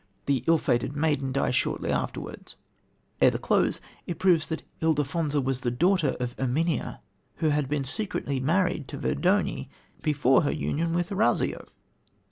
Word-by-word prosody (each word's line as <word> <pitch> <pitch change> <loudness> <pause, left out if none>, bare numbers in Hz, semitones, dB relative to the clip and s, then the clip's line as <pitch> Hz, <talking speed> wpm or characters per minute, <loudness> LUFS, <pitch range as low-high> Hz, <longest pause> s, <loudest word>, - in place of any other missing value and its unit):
The 135 -3 +1
ill 165 0 +5
fated 120 -1 0
maiden 145 -3 0
dies 130 -1 0
shortly 125 - 0
afterwards. - - -4 0.7
Ere - - +7
the - - -2
close - - +1 0.3
it 175 - -3
proves 175 -4 +3
that 160 - -4 0.2
Ildefonsa 150 -1 +1
was 130 -1 -1
the 125 - 0
daughter 165 +3 +2
of 125 -1 -3
Erminia, 140 +3 -1 0.3
who 160 - +1
had 145 -2 0
been 145 -1 0
secretly 140 -2 -1
married 160 0 +1
to - - -6
Verdoni 175 -8 0 0.3
before 145 -3 +3
her 145 - 0
union 165 +2 -1
with 175 +1 -1
Orazio. 205 +3 +1
150 Hz, 150 wpm, -27 LUFS, 135-165 Hz, 0.7 s, Ere